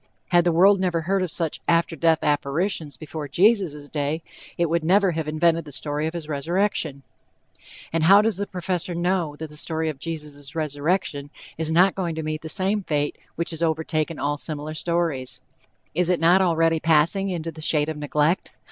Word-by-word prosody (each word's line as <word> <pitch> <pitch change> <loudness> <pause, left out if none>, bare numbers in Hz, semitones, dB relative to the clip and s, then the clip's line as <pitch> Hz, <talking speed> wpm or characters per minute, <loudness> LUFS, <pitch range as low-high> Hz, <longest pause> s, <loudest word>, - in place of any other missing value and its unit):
Had 175 -1 +4
the 175 - +4
world 190 +4 +5
never 175 -3 0
heard 190 +4 0
of 185 - -1
such 160 0 -1
after 170 0 +2
death 165 0 +2
apparitions 150 +2 -1
before 155 -1 -6
Jesus' 170 - +2
day, 150 +2 -2 0.3
it 170 - +2
would 165 0 0
never 190 +3 +4
have 160 -2 -3
invented 165 +2 +2
the 150 - -11
story 150 +2 -2
of 160 - -5
his 165 -3 -5
resurrection. 155 -1 -1 0.9
And 165 -1 +2
how 200 +4 +7
does 220 -4 +1
the 200 0 -3
Professor 180 -1 -2
know 175 -3 0
that 155 0 -8
the 150 - -11
story 160 +1 -1
of 145 -3 -6
Jesus' 150 -2 -6
resurrection 150 0 -1 0.3
is 160 0 -2
not 180 +4 +5
going 175 -4 -3
to 160 - -4
meet 155 0 -3
the 160 - -7
same 195 +5 +1
fate 145 -5 -1 0.2
which 170 +1 -2
has 160 0 -5
overtaken 160 -1 -1
all 145 - 0
other 145 - -6
similar 155 -1 -4
stories? 160 -6 -1 0.5
Is 175 +2 +1
it 180 - +2
not 175 +3 +5
already 165 -2 +2
passing 165 +5 +3
into 165 -3 -3
the 155 0 -11
shade 150 -1 +2
of 160 - -3
neglect? 150 +3 0
165 Hz, 190 wpm, -24 LUFS, 150-175 Hz, 0.9 s, how